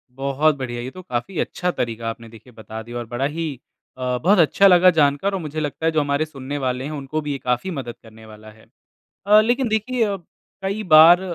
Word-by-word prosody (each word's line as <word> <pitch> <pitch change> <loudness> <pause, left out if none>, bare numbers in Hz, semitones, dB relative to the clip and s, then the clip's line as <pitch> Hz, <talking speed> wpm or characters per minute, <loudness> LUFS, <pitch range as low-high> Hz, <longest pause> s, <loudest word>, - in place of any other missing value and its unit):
बहुत 140 +3 +1
बढ़िया। 120 -2 -5
ये 125 +2 -6
तो 185 - -10
काफ़ी 155 +4 -4
अच्छा 180 0 -2
तरीका 115 -4 -3
आपने, 115 0 -8
देखिए, 115 +2 -16
बता 110 0 -9
दिया 120 +2 -8
और 120 - -5
बड़ा 120 +3 -2
ही 150 -2 -4 0.4
अ, 125 -1 -2
बहुत 190 +2 +4
अच्छा 185 +5 +5
लगा 180 -1 +6
जानकर 145 +7 +2
और 195 - -1
मुझे 155 0 -5
लगता 150 +1 -4
है, 165 - +3
जो 160 - +1
हमारे 145 +1 0
सुनने 140 -2 -7
वाले 130 0 -1
हैं, 150 - -5
उनको 150 +1 -4
भी 150 -1 -4
ये 140 - -2
काफ़ी 125 +8 -1
मदद 130 -7 -6
करने 110 0 -15
वाला 110 0 -13
है। 110 0 -20 0.6
अ, 210 +1 +7
लेकिन 240 +3 +1
देखिए 225 +3 0
अ, 200 -2 -2 0.5
कई 200 +3 -2
बार 165 +3 +9
145 Hz, 220 wpm, -21 LUFS, 120-175 Hz, 0.6 s, बार